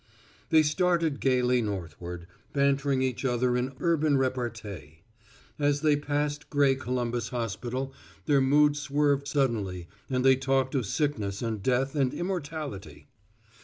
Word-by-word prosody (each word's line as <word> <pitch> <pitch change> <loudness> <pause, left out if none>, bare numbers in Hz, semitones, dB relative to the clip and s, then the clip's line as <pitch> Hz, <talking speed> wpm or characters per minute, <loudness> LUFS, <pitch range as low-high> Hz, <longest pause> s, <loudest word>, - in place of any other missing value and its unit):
They 160 -1 +6
started 165 -1 +1
gayly 125 -1 +2
northward, 90 -4 -5 0.3
bantering 140 -1 +2
each 130 -1 -2
other 125 -1 +1
in 125 +2 -1
urban 155 -4 +2
repartee. 110 - -4 0.6
As 145 -1 +2
they 155 -2 +4
passed 145 0 -2
gray 145 -2 +4
Columbus 120 -2 -2
Hospital 125 +3 -3 0.3
their 140 -3 +3
mood 145 +2 +4
swerved 145 -1 +1
suddenly 110 - -1 0.2
and 130 -1 0
they 130 -1 +6
talked 135 0 0
of 130 -7 0
sickness 110 -8 -1
and 110 -3 -2
death 130 +4 +1
and 135 -4 0
immortality. 155 - -5
135 Hz, 130 wpm, -28 LUFS, 120-145 Hz, 0.6 s, They